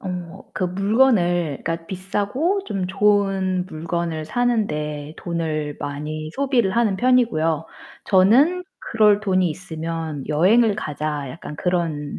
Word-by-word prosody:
어 180 -3 -6 0.2
그 185 - -2
물건을 180 - +2
그니까 165 0 -3
비싸고 205 - -1
좀 195 - -3
좋은 190 -2 +1
물건을 165 -1 -3
사는 240 +1 +1
데 150 0 -4
돈을 155 -4 -3
많이 155 +2 -5
소비를 255 -8 +1
하는 215 -5 +2
편이고요. 190 - +2 0.4
저는 260 - +4
그럴 210 -2 +3
돈이 185 -4 +2
있으면 160 -3 -5
여행을 205 +8 +4
가자, 150 -5 -3
약간 150 -1 -8
그런 165 -5 -2
180 Hz, 250 characters per minute, -22 LUFS, 155-210 Hz, 0.4 s, 저는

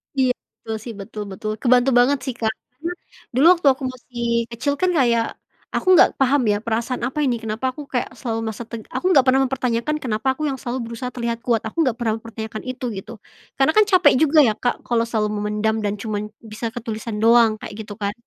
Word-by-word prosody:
Iya 260 -2 +3 0.3
betul 220 - -3
sih 235 - -6
betul 210 +1 -6
betul 215 +3 -4
kebantu 250 +1 +4
banget 275 +4 +4
sih, 260 - -2
Kak, 220 -1 0 0.2
karena 320 +7 -5 0.4
dulu 275 +5 +4
waktu 320 - 0
aku 260 - -11
masih 245 -1 -8 0.3
kecil 280 +5 -1
kan 370 0 +2
kayak, 235 -5 +3 0.5
aku - - -2
nggak - - +7
paham 270 +1 +3
ya 205 0 +3
perasaan 230 +2 -2
apa 260 +5 -2
ini 250 -3 +1
kenapa 220 +3 -3
aku 295 - -7
kayak 245 - -2
selalu 225 -3 -3
merasa 220 +2 -5
teg 230 -2 -7
aku - - -5
nggak 275 - +7
pernah 265 +1 +5
mempertanyakan 255 +2 -1
kenapa 225 -2 -2
aku 305 +2 -2
yang 270 - -1
selalu 245 0 -3
berusaha 240 +2 -5
terlihat 235 -1 -3
kuat 235 -3 +2
aku 220 - -10
nggak 255 -5 +1
pernah 225 -2 +1
mempertanyakan 220 -1 -7
itu 255 0 -5
gitu, 195 - -8 0.5
karena 270 +3 +4
kan 430 - +7
capek 370 -1 +6
juga 310 0 +5
ya, 215 - +2
Kak, 245 +2 0
kalau 235 -1 +2
selalu 215 -2 0
memendam 210 +1 0
dan 205 0 0
cuman 210 0 -4
bisa 225 +1 -5
ke 240 - -5
tulisan 220 -2 -5
doang 225 -1 +5
kayak - - -8
gitu 205 - -8
kan, 200 0 -1
235 Hz, 215 wpm, -21 LUFS, 220-260 Hz, 0.5 s, nggak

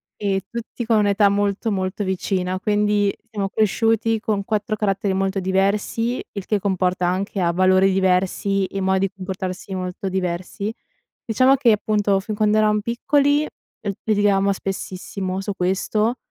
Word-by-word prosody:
e 195 -2 -1
tutti 235 +1 -5
con 225 -1 +3
un'età 205 0 +4
molto, 205 +2 0
molto 190 +1 -2
vicina, 185 -1 -1
quindi 205 0 +1 0.2
siamo 200 -2 -2
cresciuti 225 +1 +1
con 210 -2 -1
4 215 0 -1
caratteri 200 -1 0
molto 195 0 0
diversi, 200 +5 0
il 200 -2 -5
che 210 - +1
comporta 185 -2 0
anche 190 +2 -1
a 170 -1 +2
valori 185 +2 +4
diversi 190 +1 +1
e 195 - -5
modi 190 +1 +2
di - - -17
comportarsi 190 0 -5
molto 185 +1 -4
diversi. 185 +2 -3 0.5
Diciamo 255 +4 +4
che, 255 -4 +4
appunto, 210 -2 +1
fin 210 +2 -5
quando 215 0 +2
eravamo 210 -1 +3
piccoli 285 +6 +2
l 210 -7 -8
litigavamo 205 -2 +2
spessissimo 190 0 -4
su 205 +1 -3
questo, 200 +5 0
200 Hz, 145 wpm, -22 LUFS, 190-215 Hz, 0.5 s, un'età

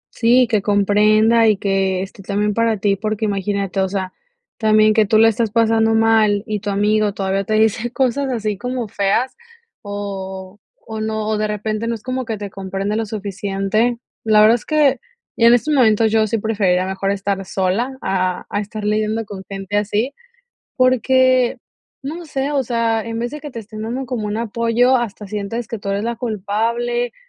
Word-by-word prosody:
Sí, 245 +2 +4
que 215 -3 +1
comprenda 215 +3 +3
y 210 -2 +3
que 190 -1 0
esté 195 +1 -10
también 205 +2 -1
para 230 0 +1
ti, 200 0 +1
porque 215 +2 -2
imagínate, 200 -1 -2
o 190 - +1
sea, 190 -1 -3 0.5
también 215 -1 +4
que 215 -2 +3
tú 215 - +3
la 225 - +6
estás 225 0 +1
pasando 225 0 +2
mal 220 -2 +3
y 210 -2 -2
tu 205 - -5
amigo 210 +1 +1
todavía 195 0 -1
te 215 - 0
dice 220 +2 +1
cosas 265 +1 0
así 215 -3 -2
como 250 -2 -3
feas, 205 +6 0 0.5
o 195 -1 -6 0.3
o 220 -1 -5
no 220 0 -2
o 215 - 0
de 215 - 0
repente 215 +2 -3
no 230 - -1
es 215 - -12
como 255 0 -3
que 225 -2 -3
te 205 -1 -7
comprende 195 +2 -3
lo 225 -1 -2
suficiente. 205 +3 -1 0.3
La 215 -1 +5
verdad 215 +2 +7
es 240 - -6
que, 290 -5 +2 0.4
y 230 - +3
en 235 +1 +8
estos 295 +5 0
momentos, 220 -4 +4
yo 220 -1 +3
sí 225 +2 0
preferiría 200 -4 +1
mejor 190 +1 -2
estar 200 -1 -1
sola 200 +9 -1
a 185 -1 -1
a 205 - 0
estar 210 +1 -6
lidiando 215 +1 0
con 200 -2 -8
gente 195 +1 -3
así, 210 +5 -1 0.6
porque, 255 0 +3 0.4
no 325 +5 -6
sé, 280 -1 -2
o 280 -2 +1
sea, 230 -2 0
en 230 0 -4
vez 240 +2 -3
de 300 - -6
que 295 -1 -8
te 235 - -6
estén 215 0 -8
dando 255 +4 -3
como 235 -3 -3
un 210 - -3
apoyo, 235 +3 +2
hasta 210 -3 -5
sientes 210 +3 -4
que 230 - -5
tú 200 - -5
eres 200 +1 -1
la 235 0 -3
culpable, 235 +2 -1
215 Hz, 190 wpm, -19 LUFS, 200-235 Hz, 0.6 s, en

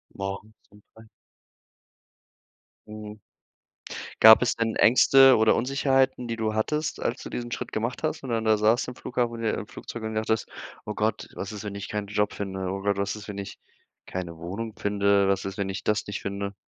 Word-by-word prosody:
Morgens 100 +2 -5 0.2
um 105 - -19
3. 110 0 -16 1.8
Mhm. 105 0 -9 1.0
Gab 110 0 +9
es 125 -2 +1
denn 115 -1 -1
Ängste 135 +2 +7
oder 110 0 +4
Unsicherheiten, 135 -1 +1
die 115 -1 -3
du 110 -1 -1
hattest, 150 +8 -1
als - - -2
du - - -7
diesen 120 0 -5
Schritt - - -4
gemacht 115 +3 -2
hast - - -2
und 130 - -6
dann 115 -1 -1
da 110 -1 +4
saßt 110 +4 +2
im 125 - -7
Flughafen 120 -1 -2
oder 115 -1 -1
im 105 - -6
Flugzeug 120 - -8
und 110 0 -3
gedacht 110 0 -2
hast: 110 0 +1 0.4
„Oh - - -4
Gott, - - -1
was 95 - -5
ist, 105 -1 -7
wenn 100 -1 -5
ich 100 - -6
keinen 105 -1 -3
Job 105 0 0
finde? 95 -2 -4
Oder 100 +1 -1
was 100 +2 -2
ist, 105 0 -10
wenn 105 -1 -6
ich 100 0 -7 0.5
keine 85 -3 -6
Wohnung 100 +7 -5
finde? 100 -1 +2
Was 95 -1 0
ist, 95 0 -5
wenn 100 -1 -2
ich 95 - -5
das 105 - 0
nicht 105 - -4
finde?” 100 0 -4
110 Hz, 200 wpm, -26 LUFS, 100-115 Hz, 1.8 s, Gab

